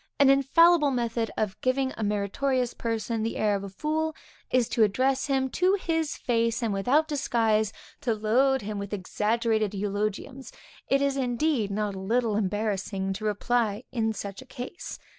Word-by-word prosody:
An 275 -1 +6
infallible 300 +3 +5
method 235 -3 -1
of 210 -3 -2
giving 260 +1 +1
a 225 - -4
meritorious 235 +5 0
person 225 0 -2
the 225 +1 -2
air 210 -1 +2
of 200 - -3
a 200 - -6
fool, 310 +9 -2 0.3
is 250 -3 +2
to 235 - 0
address 260 +7 +2
him 265 -1 +1
to 370 +2 +3
his 325 -5 -1
face 230 0 0
and 220 -3 0
without 260 +11 +2
disguise, 225 -7 +1 0.3
to 230 -3 0
load 250 +5 +2
him 210 0 -4
with 200 +1 -6
exaggerated 215 +2 0
eulogiums; 210 +6 -3 0.4
it 275 +1 +2
is 280 -1 +1
indeed 250 -2 0
not 205 0 -2
a 190 - -6
little 225 +2 0
embarrassing 200 -1 -1
to 215 +3 -6
reply 215 +1 0
in 225 -3 0
such 200 0 -6
a - - -12
case. 255 +9 -7
230 Hz, 165 wpm, -27 LUFS, 210-270 Hz, 0.4 s, An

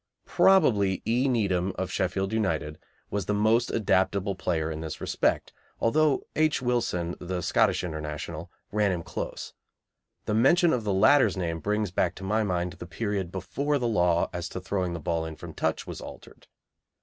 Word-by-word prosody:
Probably 105 - +3
E. 125 +4 +2
Needham, 95 -6 +1
of 95 - -3
Sheffield 95 +2 -1
United, 80 -8 -1 0.3
was 100 -2 -2
the 105 - +1
most 110 +3 +3
adaptable 100 -1 +1
player 80 -4 -1
in 80 0 -5
this 80 -2 -6
respect, - - 0 0.3
although 150 +4 +2
H. 155 -1 +2
Wilson, 115 -9 -1
the 90 0 -3
Scottish - - +2
International, 80 0 -5 0.2
ran 105 -1 +2
him 85 -2 -3
close. - - -6 0.7
The 105 - -1
mention 165 - +4
of 115 -4 -1
the 105 - +1
latter's 130 +5 +4
name 85 -2 -2
brings 105 +1 -1
back 90 -1 0
to 95 - -10
my 105 +3 +1
mind 90 -3 -1
the 85 - -9
period 95 0 -3
before 140 - -1
the 125 -3 -1
law 90 -6 +2
as 85 -1 -4
to - - -5
throwing 95 -1 -2
in - - -4
the - - -4
ball 80 0 -2
from - - -9
touch - - -1
was - - -7
altered. - - -12
95 Hz, 175 wpm, -27 LUFS, 85-110 Hz, 0.7 s, mention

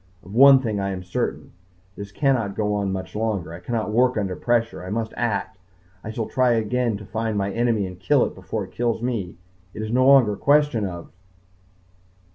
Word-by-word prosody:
Of 95 - -12
one 135 +3 +8
thing 110 -5 -2
I 100 0 -1
am 95 -1 -5
certain 90 - -3 0.4
this 100 -1 -8
cannot 120 -6 0
go 105 -1 -1
on 100 -2 -1
much 95 +1 -5
longer. 105 -6 -2
I 85 - -8
cannot 110 +3 -3
work 125 +2 +2
under 95 -3 -2
pressure. 115 -4 -1
I 90 - -7
must 110 +2 -3
act. 105 -4 -2 0.4
I - - -6
shall 110 0 -3
try 125 0 +2
again 115 0 0
to 105 - -11
find 110 0 -3
my 100 0 -1
enemy 115 -3 +1
and 90 -1 -9
kill 145 +3 +3
it - - -5
before 110 -2 -5
it 95 - -11
kills 120 +2 -1
me. 110 -8 -3 0.4
It 110 - -4
is 110 - -4
no 130 +2 +3
longer 135 -6 +6
a - - -7
question 145 -7 +2
of 85 -2 -8
110 Hz, 205 wpm, -23 LUFS, 100-120 Hz, 0.4 s, one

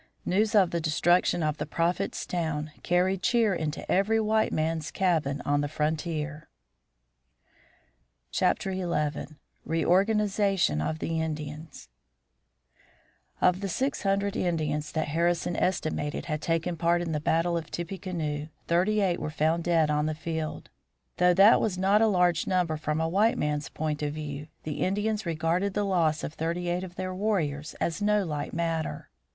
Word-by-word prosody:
News 210 +4 +1
of 190 -4 +5
the 170 - -1
destruction 175 +2 +2
of 155 0 0
the - - -3
Prophet's 175 +4 -1
town 160 -3 -2
carried 180 +2 +1
cheer 230 -3 +3
into 155 -3 -3
every 210 +4 +3
white 220 0 +2
man's 160 0 -1
cabin 155 -7 0
on 145 0 +2
the 145 - -1
frontier. 150 0 -3 1.8
XI. - - +3 1.1
REORGANIZATION 195 - +2
OF 80 0 -2
THE 160 - -2
INDIANS 150 - -6 1.5
Of 180 +1 +3
the 200 - -2
six 265 +10 -1
hundred 200 0 0
Indians 155 -4 -1
that 155 -2 -1
Harrison 170 +2 +1
estimated 155 -5 -1
had 155 -2 -3
taken 170 +1 -1
part 170 +1 +2
in 165 - -3
the 150 - 0
battle 165 +3 +1
of 165 -1 -3
Tippecanoe, 170 -4 -4 0.2
thirty 190 +5 +2
eight 185 -3 +1
were - - -3
found 160 +2 +1
dead 165 -3 +2
on 150 +1 +1
the 155 - -2
field. 160 0 -4 0.5
Though 180 0 +4
that 200 +5 +7
was 195 -5 0
not 195 +3 +3
a 225 - +5
large 180 -5 +2
number 180 -4 +1
from 155 0 -2
a 160 - +1
white 205 +7 +2
man's 150 0 -1
point 150 -1 -3
of 145 -1 -1
view, 150 -1 -6 0.2
the 155 -2 -4
Indians 210 +1 0
regarded 170 +4 0
the 205 -1 +1
loss 165 -5 +1
of 150 - -4
thirty 170 +2 -2
eight 175 +1 -1
of 180 -1 -8
their 185 0 -4
warriors 170 -8 -1
as 170 +4 -2
no 210 -1 +2
light 150 -3 -3
matter. 165 - -3
170 Hz, 155 wpm, -28 LUFS, 155-190 Hz, 1.8 s, that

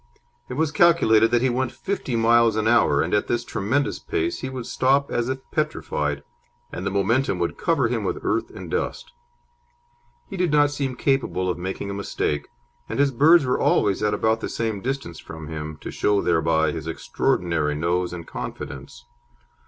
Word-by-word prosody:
It - - -5
was 155 +1 +1
calculated 145 -10 +5
that 120 +1 +2
he 130 - +3
went 125 0 -1
fifty 195 -11 -3
miles 115 0 +4
an 110 0 0
hour, 75 -11 +4
and 85 - -3
at 105 - +2
this 120 0 0
tremendous 135 +9 -1
pace 365 -4 -2
he 130 - -4
would 130 -2 -6
stop 135 +3 +1
as 120 +1 -1
if 130 0 -3
petrified, 75 - -2 0.5
and 90 - -5
the - - +1
momentum 100 +3 +1
would 85 -1 -1
cover 145 -8 +1
him 115 -2 -2
with 95 - -2
earth 335 - 0
and - - -9
dust. - - -3 1.2
He 195 - -7
did 180 -3 +1
not 145 -1 +4
seem 135 -3 -3
capable 135 -10 0
of 90 - -6
making 95 +2 -4
a - - -4
mistake, 75 -7 -2 0.4
and - - -3
his 140 0 +3
birds 150 +5 +5
were 125 - 0
always 100 -2 +2
at 105 -1 +1
about 110 +2 +1
the - - -4
same 110 -4 -2
distance 130 -9 -4
from 80 -1 -9
him, 75 -1 -6
to - - -6
show 105 -1 +1
thereby 80 -3 +2
his 80 0 -6
extraordinary 80 0 0
nose 85 +3 0
and 85 -2 -7
confidence. 65 -3 -7
115 Hz, 185 wpm, -23 LUFS, 85-135 Hz, 1.2 s, calculated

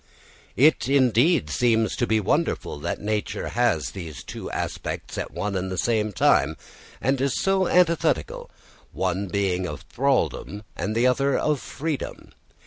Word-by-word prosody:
It 145 0 +4
indeed 135 - +3
seems 115 -2 +2
to 120 - 0
be 110 0 +2
wonderful 95 -6 -1
that - - -3
nature 105 0 -2
has 80 - +1
these 85 -7 -8
two - - -7
aspects - - -4
at - - -3
one 100 -1 -3
and 95 0 -2
the 95 - -3
same 110 -1 +1
time, 80 -5 +3 0.4
and 135 +1 +1
so 195 +3 +1
antithetical 165 - +1 0.4
one 95 +1 -1
being 95 -1 0
of 75 -4 -6
thraldom 110 - -1
and 105 +2 -3
the 120 +2 +3
other 135 +2 +2
of 150 -2 +1
freedom. 150 +2 -5
110 Hz, 140 wpm, -24 LUFS, 95-140 Hz, 0.4 s, It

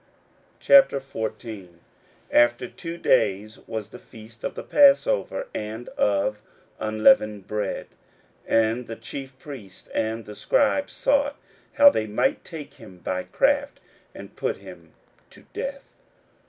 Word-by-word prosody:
41:014:001 115 - +2 0.6
After 120 +1 +3
two 165 +6 -8
days 105 - +1
was 110 -2 -5
the 125 - -10
feast 110 0 -15
of - - -3
the - - -6
passover, 470 - +3
and 110 +3 -5
of 105 +1 0 0.4
unleavened 110 - +3
bread: 105 -2 -3 0.6
and 115 +2 +1
the 115 - -6
chief 135 +1 -8
priests 125 -10 -11
and 110 0 -2
the 105 +1 -9
scribes 285 - +1
sought 285 0 +1 0.4
how 285 0 +8
they 110 - -2
might 190 - 0
take 160 -4 -9
him 90 - -14
by 90 +1 -3
craft, 285 +1 +1 0.4
and - - -11
put - - -2
him - - -14 0.4
to - - -17
death. 275 0 -6
115 Hz, 125 wpm, -24 LUFS, -, 0.6 s, how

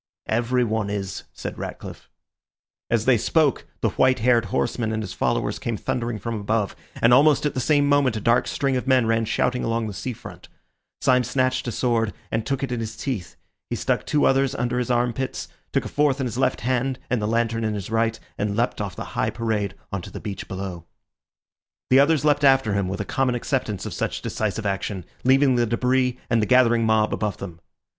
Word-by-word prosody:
"Everyone 115 -2 0
is," 100 -2 -4
said - - -7
Ratcliffe. - - -8 0.8
As 115 -1 +1
they 125 -4 +4
spoke, 150 +4 +1
the - - +2
white 130 0 +3
haired 120 -1 +3
horseman 110 - -1
and 110 0 -2
his 95 - -6
followers - - -1
came 115 -2 -3
thundering 120 0 -2
from 115 +3 -4
above, 105 -1 -1 0.2
and 115 +1 +4
almost 150 +4 +5
at 150 - 0
the - - -2
same 145 +2 +3
moment 140 -4 +3
a - - -2
dark 115 +3 +2
string 135 -2 0
of 125 +1 -2
men 130 -3 +4
ran 115 0 +1
shouting 125 +3 0
along 115 0 0
the 105 - -5
sea 125 +6 -4
front. - - -11 0.5
Syme 125 -2 +4
snatched 130 +1 0
a - - -1
sword, 115 -2 0 0.2
and 110 0 -1
took 135 0 -1
it 135 - -2
in 120 - -1
his 110 -1 -5
teeth; 110 -11 -4 0.3
he - - -1
stuck - - 0
two 150 - +2
others 135 0 +2
under 125 +1 -1
his 125 - -2
arm 120 0 +2
pits, 130 +2 -4 0.2
took - - 0
a - - -2
fourth 145 -2 +1
in 135 - 0
his 120 +1 -3
left 130 -1 +1
hand 130 +1 0
and 125 -3 +1
the 105 - -1
lantern 115 0 0
in 110 -1 -1
his 100 +1 -6
right, 115 0 +1 0.2
and 100 0 -1
leapt 120 -2 0
off 100 -3 -4
the - - -5
high - - 0
parade 110 -3 -2 0.2
on 100 - -2
to - - -9
the - - -7
beach 100 -3 -6
below. 95 -3 -5 1.1
The 130 - +7
others 150 +1 +3
leapt 145 -1 +3
after 135 -6 +4
him, 100 -2 0
with 95 +2 -3
a - - -3
common 130 +1 0
acceptance 120 -5 -2
of - - -5
such - - -3
decisive 110 0 -2
action, 95 -2 -2 0.2
leaving 135 +1 +4
the 120 -1 +2
debris 125 +2 +1
and 115 -1 +2
the 105 - 0
gathering 120 -3 +4
mob 110 -1 +2
above 105 -2 -2
them. 90 -4 -8
115 Hz, 210 wpm, -23 LUFS, 110-130 Hz, 1.1 s, The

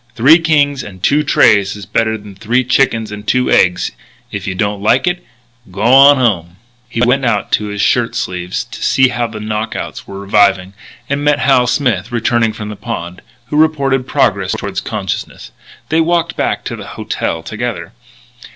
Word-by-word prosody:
Three 145 +9 +6
kings 145 -4 +1
and 95 -5 -11
two 145 +2 +3
trays 100 -9 +3
is 105 - -9
better 110 -1 0
than 105 -1 -12
three 115 +6 0
chickens 120 -4 +1
and 105 0 -9
two 125 0 +1
eggs. 90 -1 +2 0.4
If - - -5
you 95 - -3
don't 100 +1 -2
like 120 - +2
it, 180 0 -1 0.5
g'wan 130 +9 +5
home." 90 -9 0 0.3
He 120 -1 -3
went 135 +3 +2
out 115 -5 +1
in 105 -1 -5
his 105 -1 -3
shirt 120 -2 +1
sleeves 90 0 -3
to - - -11
see 130 -1 +3
how 120 -1 -2
the 110 -1 -8
knock 105 0 -3
outs - - -6
were 100 0 -8
reviving, 100 -1 +2 0.3
and 140 +1 -2
met 145 0 +3
Hal 130 -3 +3
Smith 125 -5 0
returning 120 -1 +1
from 105 0 -7
the 105 - -6
pond, 90 -6 -6 0.3
who 150 - -1
reported 135 -5 +1
progress - - +1
toward - - -4
consciousness. - - -5 0.4
They 160 +1 +2
walked 170 0 0
back - - -1
to - - -4
the - - -9
"hotel" 80 - -3
together. 110 -4 -5
115 Hz, 180 wpm, -15 LUFS, 100-135 Hz, 0.5 s, Three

